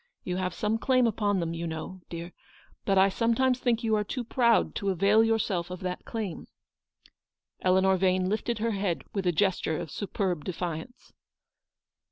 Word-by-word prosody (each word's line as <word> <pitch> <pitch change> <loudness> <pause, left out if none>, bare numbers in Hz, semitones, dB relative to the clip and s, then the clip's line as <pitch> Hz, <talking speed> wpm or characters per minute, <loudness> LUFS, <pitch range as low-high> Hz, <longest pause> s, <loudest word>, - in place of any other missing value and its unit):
You 180 0 -2
have 185 -1 -2
some 215 +1 0
claim 255 0 +3
upon 205 -3 +1
them, 165 -1 -2
you 170 0 -4
know, 165 +3 -6
dear, 170 +1 -7 0.5
but 195 -1 +2
I 190 +1 +6
sometimes 235 +5 +1
think 235 -2 +1
you 220 -1 +1
are 210 - +1
too 245 +4 -4
proud 235 0 +2
to 200 - -1
avail 200 +4 +4
your 225 0 +3
self 180 -5 -2
of 180 +1 -7
that 180 -1 -4
claim/' 215 -7 -5 1.1
Eleanor 190 +1 +3
Vane 185 0 +2
lifted 220 +3 -1
her 230 +1 0
head 195 -4 -1
with 195 -3 -1
a - - +4
gesture 175 -2 +1
of 165 -4 -6
superb 185 -5 -2
defiance. 175 +5 -5
195 Hz, 175 wpm, -28 LUFS, 180-225 Hz, 1.1 s, I